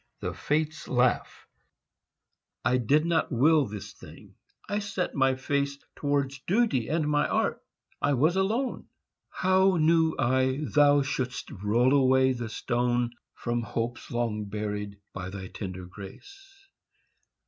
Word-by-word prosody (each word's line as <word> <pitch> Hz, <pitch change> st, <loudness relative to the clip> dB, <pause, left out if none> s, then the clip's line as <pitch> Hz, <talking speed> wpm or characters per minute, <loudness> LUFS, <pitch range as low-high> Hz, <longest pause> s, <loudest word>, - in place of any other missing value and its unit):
THE -, -, -3 dB
FATES 155 Hz, +1 st, -2 dB
LAUGH 125 Hz, -1 st, +2 dB, 1.4 s
I 125 Hz, +2 st, +3 dB
did 145 Hz, +6 st, +2 dB
not 170 Hz, -2 st, +1 dB
will 145 Hz, +3 st, +4 dB
this 105 Hz, -1 st, -8 dB
thing. -, -, -14 dB, 0.3 s
I 205 Hz, -, -1 dB
set 200 Hz, -3 st, -3 dB
my 135 Hz, -2 st, +2 dB
face 140 Hz, +1 st, -1 dB, 0.2 s
Towards 140 Hz, -2 st, -1 dB
duty 195 Hz, -, +2 dB
and 155 Hz, +1 st, 0 dB
my 150 Hz, 0 st, +2 dB
art; -, -, 0 dB, 0.4 s
I 145 Hz, -, +2 dB
was 155 Hz, +7 st, +3 dB
alone. 220 Hz, +7 st, -1 dB, 0.4 s
How 190 Hz, 0 st, +3 dB
knew 160 Hz, 0 st, +3 dB
I 130 Hz, +2 st, +1 dB
thou 145 Hz, -1 st, +4 dB
shouldst 130 Hz, -2 st, -3 dB
roll 115 Hz, +7 st, +2 dB
away 130 Hz, -1 st, +4 dB
the 120 Hz, -3 st, -4 dB
stone 120 Hz, +1 st, 0 dB, 0.2 s
From 120 Hz, 0 st, -2 dB
hopes 115 Hz, +2 st, -4 dB
long 115 Hz, -3 st, -2 dB
buried, 105 Hz, -1 st, -4 dB, 0.2 s
by 95 Hz, 0 st, -5 dB
thy 95 Hz, -1 st, -7 dB
tender 95 Hz, -3 st, -6 dB
grace? 390 Hz, -, -13 dB
130 Hz, 130 wpm, -28 LUFS, 120-160 Hz, 1.4 s, will